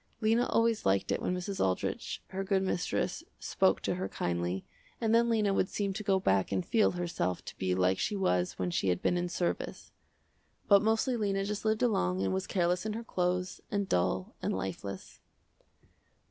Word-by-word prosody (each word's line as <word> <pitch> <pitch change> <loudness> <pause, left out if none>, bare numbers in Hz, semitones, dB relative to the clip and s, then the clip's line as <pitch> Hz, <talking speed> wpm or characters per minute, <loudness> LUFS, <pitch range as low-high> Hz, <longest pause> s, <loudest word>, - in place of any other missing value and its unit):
Lena 225 +2 +3
always 230 -1 +2
liked 95 0 +2
it - - 0
when 180 - 0
Mrs. 190 +1 -2
Aldrich 95 -1 -2
her 195 +1 -3
good 195 -1 +1
mistress 180 -2 -1 0.2
spoke - - +2
to - - 0
her 95 +2 -3
kindly, 90 +1 -2 0.3
and 225 -1 +1
then 235 +1 +4
Lena 215 -3 +2
would 190 - +1
seem 200 -2 -1
to 215 - -4
go 195 -2 +2
back 95 - +1
and 95 -2 0
feel 220 -4 +3
herself 170 - -2
to - - -9
be 95 -1 +1
like 95 0 +2
she 210 - 0
was 90 - +1
when 90 -1 -1
she 95 - +1
had 90 0 0
been - - +2
in 175 0 -1
service. 175 0 -3 0.8
But 200 -1 +7
mostly 225 +4 +2
Lena 195 -3 0
just 210 +1 -4
lived 215 +1 +2
along 95 - +1
and 95 -1 0
was 95 - -2
careless 180 -1 +1
in 215 0 -2
her 230 +2 -5
clothes, 180 -2 -1
and 200 -1 -1
dull, 90 - 0
and - - -1
lifeless. 95 +1 -6
180 Hz, 190 wpm, -31 LUFS, -, 0.8 s, But